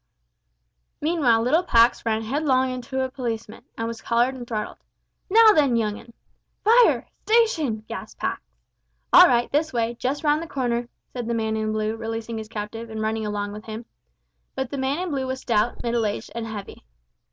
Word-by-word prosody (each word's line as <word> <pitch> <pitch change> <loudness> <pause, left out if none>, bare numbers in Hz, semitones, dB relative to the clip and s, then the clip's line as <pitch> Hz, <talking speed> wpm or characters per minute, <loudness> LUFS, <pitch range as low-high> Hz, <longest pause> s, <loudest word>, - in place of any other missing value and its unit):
Meanwhile 290 -8 +2
little 300 +8 +3
Pax 235 -8 +3
ran 220 0 0
headlong 260 +1 +1
into 255 +1 -3
a 260 - -6
policeman, 230 -4 -5
and 225 - -2
was 230 -1 -6
collared 240 +2 +1
and 245 -2 -8
throttled. 215 -3 -4 0.5
"Now 445 +2 +8
then, 280 -8 +3
young 215 -2 -1
'un!" 235 - -15 0.5
"Fire! 465 +3 +5 0.2
station!" 325 - +2
gasped - - -8
Pax. - - -2 0.7
"All 360 - +10
right, 240 -5 +1
this 315 +2 +1
way 235 -1 -1
just 275 +5 -2
round 300 +1 +2
the 335 - -6
corner," 245 -4 -2 0.2
said 245 -3 -4
the 235 - -1
man 220 -1 -1
in 215 0 -1
blue, 215 0 -1
releasing 225 0 -5
his 215 -1 -8
captive, 225 +1 -6
and 220 0 -6
running 220 0 -1
along 205 -1 -3
with 210 +1 -9
him; 220 +1 -7 0.7
but 265 -2 -3
the 280 - -3
man 265 +2 0
in 360 -1 -3
blue 265 -2 -2
was 260 0 -3
stout, 230 0 0
middle 235 -2 +1
aged, 205 - -5
and 230 -1 -4
heavy. 210 -3 -8
235 Hz, 185 wpm, -24 LUFS, 220-270 Hz, 0.7 s, All